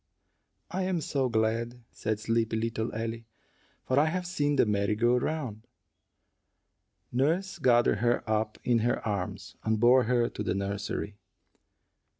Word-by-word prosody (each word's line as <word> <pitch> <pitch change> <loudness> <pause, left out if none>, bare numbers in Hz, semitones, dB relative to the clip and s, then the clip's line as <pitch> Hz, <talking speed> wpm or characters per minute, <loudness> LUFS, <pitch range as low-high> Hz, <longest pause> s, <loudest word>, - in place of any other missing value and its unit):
"I 185 - -1
am 185 -2 0
so 135 -4 -1
glad," 115 +2 0
said 110 -1 -2
sleepy 115 0 0
little 115 0 -2
Ellie, 115 +1 -4 0.6
"for 130 +2 +2
I 150 - +4
have 180 +2 -2
seen 145 -5 0
the - - +4
merry 105 0 +1
go 120 +3 +3
round." 125 -5 -3 1.4
Nurse 165 +9 0
gathered 120 -4 +4
her 120 0 +1
up 110 0 0
in 120 -2 +3
her 120 0 0
arms, 100 -4 -4
and 110 -1 +1
bore 125 +2 +5
her 120 0 +2
to - - -7
the 105 - -1
nursery. 100 +1 -3
115 Hz, 145 wpm, -29 LUFS, 110-130 Hz, 1.4 s, bore